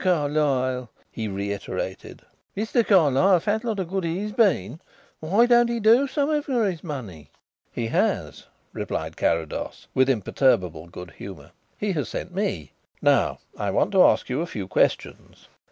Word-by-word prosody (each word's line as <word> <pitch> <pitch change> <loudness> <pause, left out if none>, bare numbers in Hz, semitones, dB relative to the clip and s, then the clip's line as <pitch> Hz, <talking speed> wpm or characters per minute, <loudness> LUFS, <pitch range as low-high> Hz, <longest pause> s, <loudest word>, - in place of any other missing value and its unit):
Carlyle!" 145 - 0 0.2
he 110 -1 -4
reiterated; 100 0 -5 0.3
"Mr. 225 +3 +1
Carlyle! 180 -1 +4
Fat 215 +6 -1
lot 225 -3 -2
of 185 - -2
good 190 +1 -2
he's 185 +6 -2
been. 160 - +1 0.4
Why 195 +9 +3
don't 240 -1 +4
he 235 0 -1
do 230 +6 +5
something 295 +2 0
for 255 -6 0
his 175 -4 -4
money?" 115 - -7 0.4
"He 120 - -3
has," 115 - -1 0.3
replied - - -4
Carrados, 80 -2 -2
with 130 +1 +3
imperturbable 95 - +1
good 90 0 -10
humour; 85 -8 -10 0.3
"he 205 -1 -1
has 150 -6 -2
sent 180 - -6
me. 175 - -2 0.3
Now, - - +2 0.2
I 100 - -2
want 100 - +1
to 190 -2 +6
ask - - +3
you 130 +4 -1
a 170 - -3
few 100 - -6
questions." - - -1
155 Hz, 155 wpm, -24 LUFS, -, 0.4 s, to